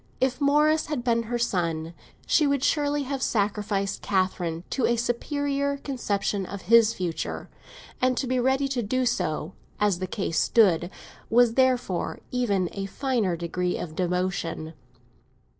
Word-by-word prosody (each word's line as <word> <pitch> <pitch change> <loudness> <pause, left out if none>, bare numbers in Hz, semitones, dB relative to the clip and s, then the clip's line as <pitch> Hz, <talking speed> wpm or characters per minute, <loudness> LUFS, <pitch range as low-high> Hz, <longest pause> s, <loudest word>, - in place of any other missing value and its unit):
If 260 +2 0
Morris 300 +2 +3
had 295 -6 -3
been 235 -1 +2
her 240 - 0
son, 170 -8 -1 0.3
she 305 -3 +3
would 280 -2 +1
certainly 290 -1 +1
have 270 0 -4
sacrificed 205 -3 -1
Catherine 180 -3 -1
to 260 - +1
a 235 - +2
superior 280 +4 -1
conception 210 -8 -2
of 190 +1 -7
his 230 -1 +6
future; 175 -3 -4 0.5
and 255 -1 +2
to - - 0
be 255 0 0
ready 265 +2 +2
to 260 -2 -1
do 255 +4 0
so 195 -7 -1 0.3
as 205 -4 +2
the 185 - -3
case 185 -6 -1
stood 180 -7 +3 0.4
was 240 0 +5
therefore 250 -8 +1
even 205 -8 +1
a 195 -1 -4
finer 230 -5 0
degree 180 +1 -2
of 155 -3 -6
devotion. 180 -3 -2
230 Hz, 145 wpm, -26 LUFS, 185-260 Hz, 0.5 s, his